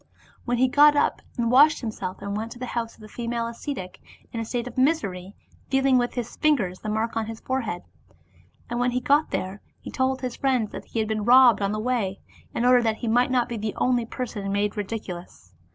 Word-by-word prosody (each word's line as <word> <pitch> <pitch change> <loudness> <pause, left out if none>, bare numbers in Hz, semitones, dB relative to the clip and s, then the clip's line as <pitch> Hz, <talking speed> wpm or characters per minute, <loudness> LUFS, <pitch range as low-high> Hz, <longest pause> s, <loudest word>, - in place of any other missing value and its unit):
Then 245 0 +1
he 260 +2 +4
got 290 +3 +6
up - - +1 0.2
and 235 -1 +1
washed 295 +5 +6
himself 195 -5 -5
and 200 0 -3
went 220 +2 -4
to - - -14
the 250 - -5
house 235 -1 -4
of - - -20
the 215 - -10
female 235 +1 -3
ascetic, 230 -4 -6 0.3
in 230 - -3
a 225 - -3
state 240 +1 -3
of 250 - -8
misery, 205 - 0 0.3
feeling 270 -1 +3
with 245 0 -1
his 240 -3 -5
fingers 215 -13 +1
the 215 - -5
mark 220 +2 -1
on 225 -1 -1
his 225 0 -7
forehead. 240 -9 -3 0.8
And 240 - -3
when 245 0 +2
he 250 - +1
got 285 +4 +2
there, 190 +2 -4 0.2
he - - -9
told 260 0 0
his 250 -2 -4
friends 255 -6 +1
that - - -8
he - - -7
had 220 -1 +1
been 215 -1 -1
robbed 245 -1 +7
on 200 0 +1
the 215 - -2
way, 215 -5 -1 0.4
in 235 - 0
order 250 0 +6
that 220 -2 0
he 235 - -4
might 245 +3 +3
not 250 -2 +2
be 235 - -4
the 215 0 -3
only 245 -2 +1
person 215 -6 -4
made 205 +1 0
ridiculous. 185 - -6
235 Hz, 225 wpm, -25 LUFS, 215-255 Hz, 0.8 s, robbed